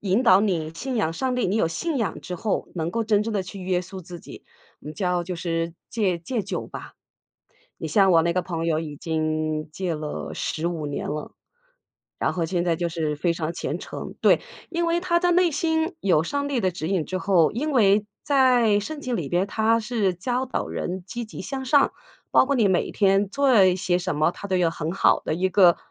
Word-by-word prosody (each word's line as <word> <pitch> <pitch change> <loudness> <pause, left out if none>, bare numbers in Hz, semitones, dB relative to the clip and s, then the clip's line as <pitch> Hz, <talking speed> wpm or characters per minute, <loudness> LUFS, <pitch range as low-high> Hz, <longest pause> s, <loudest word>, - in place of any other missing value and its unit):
引 200 +4 +1
导 195 -5 +6
你 170 -7 -1
信 260 +7 -4
仰 180 -8 +1
上 255 +9 -1
帝， 250 - 0
你 190 +3 0
有 165 - +2
信 300 - -2
仰 225 - -2
之 180 - -6
后 205 +4 -2
能 165 -1 -2
够 230 +4 -1
真 210 -1 +3
正 225 +1 -3
地 200 -3 0
去 190 +2 -9
约 180 -1 0
束 185 +1 -9
自 175 0 -9
己， - - -12 0.4
我 - - -15
们 150 - -6
叫 180 -3 0
就 180 +1 -5
是 165 -1 -2 0.2
戒 195 -6 0
戒 220 +5 -3
酒 190 - -4
吧。 - - -9 0.8
你 - - -4
像 195 -3 +4
我 165 -1 +5
那 170 +1 +1
个 180 +1 0
朋 165 -2 -4
友 160 -2 +1
已 150 -3 -6
经 155 -1 -2
戒 180 -1 -2
了 150 - -5
15 165 -1 -2
年 145 - -4
了， 150 +1 -5 0.9
然 - - 0
后 170 -2 -1
现 175 +1 -1
在 170 -2 +2
就 170 0 -1
是 160 -3 -2
非 170 +3 +1
常 165 -1 -3
虔 - - -3
诚。 - - -7
对， - - +5 0.3
因 340 0 0
为 335 +1 +1
他 345 -1 +1
的 355 0 +2
内 355 0 +4
心 320 +2 0
有 175 -5 +3
上 285 +10 -2
帝 270 -4 0
的 190 -3 +1
指 165 -2 -4
引 185 -6 0
之 185 - -3
后， 185 -5 +3
因 290 +8 -2
为 205 -3 +4 0.2
在 250 -7 +4
圣 300 +8 -6
经 255 -4 -3
里 160 -8 -3
面 175 +4 +1
它 220 +2 +2
是 215 -4 0
教 245 +8 -1
导 260 - -2
人 180 0 -4
积 240 +3 -5
极 215 - -9
向 270 -1 -5
上， 280 +2 +4 0.4
包 - - +5
括 280 - +1
你 225 - +4
每 185 -2 +1
天 195 0 +3
做 265 -4 +4
一 185 -1 +3
些 180 -1 +1
什 175 -4 -3
么， 155 +2 +3
它 200 - -8
都 190 - +1
有 175 -2 +2
很 165 -1 -4
好 195 - +3
的 - - -2
一 185 +3 +1
个 180 -2 +5
185 Hz, 240 characters per minute, -24 LUFS, 170-235 Hz, 0.9 s, 导